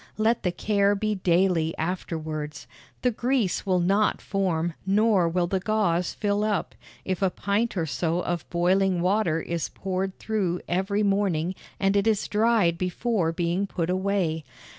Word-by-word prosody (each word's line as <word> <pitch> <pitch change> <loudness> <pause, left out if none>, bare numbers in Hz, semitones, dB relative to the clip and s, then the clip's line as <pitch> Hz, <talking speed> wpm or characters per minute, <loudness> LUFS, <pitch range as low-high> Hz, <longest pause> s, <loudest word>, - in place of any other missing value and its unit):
Let 225 +2 +2
the 180 - 0
care 200 +2 +2
be 215 +1 -1
daily 175 -3 +1
afterwards. 155 -3 -4 0.4
The 250 - +3
grease 240 -5 0
will 185 -1 +3
not 195 +4 +2
form, 175 -4 -1
nor 200 -2 +3
will 175 +1 +1
the 190 +2 -1
gauze 180 -4 +1
fill 205 0 0
up, 210 -4 -1 0.3
if 185 0 -2
a 190 - +3
pint 205 +4 -1
or 165 - +1
so 165 +2 -1
of 170 -6 -3
boiling 180 +1 +2
water 180 -4 +2
is 170 0 -3
poured 190 0 -3
through 190 -5 -1
every 195 +4 0
morning 195 -4 +1 0.3
and 195 0 +2
it 200 +2 +2
is 215 -2 +1
dried 210 -6 +2
before 185 -1 0
being 175 +3 -1
put 175 -2 -2
away. 185 -4 0
190 Hz, 155 wpm, -26 LUFS, 170-205 Hz, 0.4 s, The